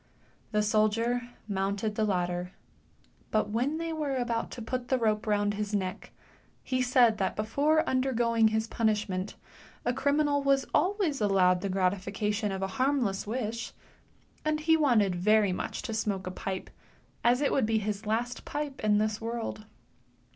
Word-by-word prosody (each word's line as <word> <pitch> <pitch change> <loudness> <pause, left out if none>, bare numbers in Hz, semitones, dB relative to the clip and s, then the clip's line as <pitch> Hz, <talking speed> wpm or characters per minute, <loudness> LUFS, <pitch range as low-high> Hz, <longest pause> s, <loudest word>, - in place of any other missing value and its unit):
The 210 -1 +2
soldier 230 +3 +1 0.2
mounted 200 +1 -1
the 215 0 0
ladder, 180 -2 -1 0.8
but 215 -1 0
when 255 +8 0
they 330 0 -3
were 295 -4 -2
about 240 -2 -1
to - - -7
put 250 +1 -3
the 260 - +2
rope 215 -2 0
round 205 -1 +2
his 210 0 -2
neck, 185 -2 -3 0.5
he 255 -1 0
said 245 -3 +4
that 190 - 0
before 285 +9 +1
undergoing 240 -3 +2
his 220 0 0
punishment 210 -4 -1 0.5
a 245 - +2
criminal 285 +2 +2
was 275 -1 +2
always 365 - +1
allowed 185 -3 +3
the 200 - -2
gratification 200 +3 0
of 190 0 -3
a - - 0
harmless 255 -9 +1
wish, 230 0 -3 0.7
and 310 0 0
he 320 +1 +4
wanted 235 - +3
very 205 +2 +3
much - - -4
to 225 - -4
smoke 205 -3 -1
a 185 - -4
pipe, 190 0 -5 0.5
as 245 +2 +4
it 285 - +1
would 260 -6 +2
be 225 0 +2
his 210 0 -3
last 235 +3 -1
pipe 290 -4 -5
in 210 -1 +4
this 215 +1 0
world. 225 -1 -4
220 Hz, 160 wpm, -29 LUFS, 205-255 Hz, 0.8 s, said